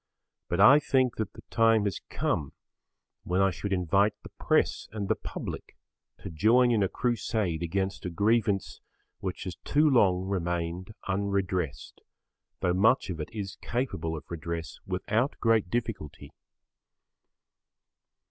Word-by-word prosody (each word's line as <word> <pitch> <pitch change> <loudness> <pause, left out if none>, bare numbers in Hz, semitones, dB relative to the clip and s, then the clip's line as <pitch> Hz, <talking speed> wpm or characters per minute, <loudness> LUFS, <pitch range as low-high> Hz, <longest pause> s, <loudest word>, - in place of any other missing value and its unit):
But - - -1
I 140 +3 +8
think 130 -4 +1
that 110 -2 -3
the - - -13
time 115 -2 +4
has 100 -4 -2
come 70 -2 -1 0.7
when 90 +2 0
I 95 0 +4
should 100 +3 -5
invite 100 +3 +2
the - - -10
press - - +1
and 105 -2 -4
the 110 - +2
public - - -7 0.5
to - - -6
join 115 +9 +4
in 110 -3 +2
a 95 - +2
crusade 110 -8 -1
against 95 +3 -2
a - - -2
grievance 105 +1 +1 0.4
which 95 -2 -4
has 90 -2 -6
too 150 +2 +2
long 95 -9 +3
remained 90 +1 -3
unredressed, 95 -6 -2 0.6
though 90 - +2
much 110 +4 +3
of 80 - -6
it 75 - -4
is 100 -2 -6
capable 80 -10 -2
of 75 - -10
redress 85 0 -5
without 110 +8 -1
great 115 -5 +2
difficulty. 95 -11 -4
100 Hz, 140 wpm, -28 LUFS, 90-110 Hz, 0.7 s, I